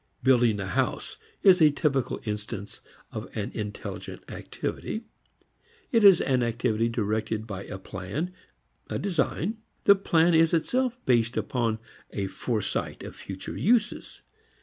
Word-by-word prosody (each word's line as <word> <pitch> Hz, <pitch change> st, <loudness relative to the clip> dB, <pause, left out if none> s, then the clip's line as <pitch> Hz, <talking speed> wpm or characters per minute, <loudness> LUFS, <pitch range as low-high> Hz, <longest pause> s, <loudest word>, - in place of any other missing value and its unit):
Building 120 Hz, -5 st, +4 dB
a 95 Hz, -, -2 dB
house 95 Hz, -, -1 dB, 0.3 s
is 185 Hz, -3 st, +7 dB
a 155 Hz, -, +8 dB
typical 140 Hz, -4 st, 0 dB
instance 105 Hz, -1 st, -5 dB, 0.3 s
of -, -, -6 dB
an -, -, -2 dB
intelligent 105 Hz, -1 st, -6 dB
activity. 220 Hz, -, -4 dB, 0.9 s
It 230 Hz, -3 st, +4 dB
is 195 Hz, -4 st, +8 dB
an 130 Hz, -2 st, +2 dB
activity 115 Hz, -1 st, +1 dB
directed 110 Hz, -1 st, -1 dB
by 100 Hz, -3 st, -6 dB
a 95 Hz, -, -6 dB
plan, 95 Hz, -, -5 dB, 0.6 s
a -, -, -1 dB
design. 185 Hz, +3 st, -1 dB, 0.3 s
The 200 Hz, -, +8 dB
plan 175 Hz, -3 st, +3 dB
is 165 Hz, +1 st, +5 dB
itself 250 Hz, +9 st, 0 dB
based 120 Hz, -2 st, +2 dB
upon 115 Hz, -3 st, 0 dB, 0.3 s
a 100 Hz, -, -3 dB
foresight 110 Hz, +2 st, -2 dB
of -, -, -8 dB
future 95 Hz, -1 st, -7 dB
uses. 220 Hz, 0 st, +1 dB
120 Hz, 130 wpm, -27 LUFS, 105-170 Hz, 0.9 s, a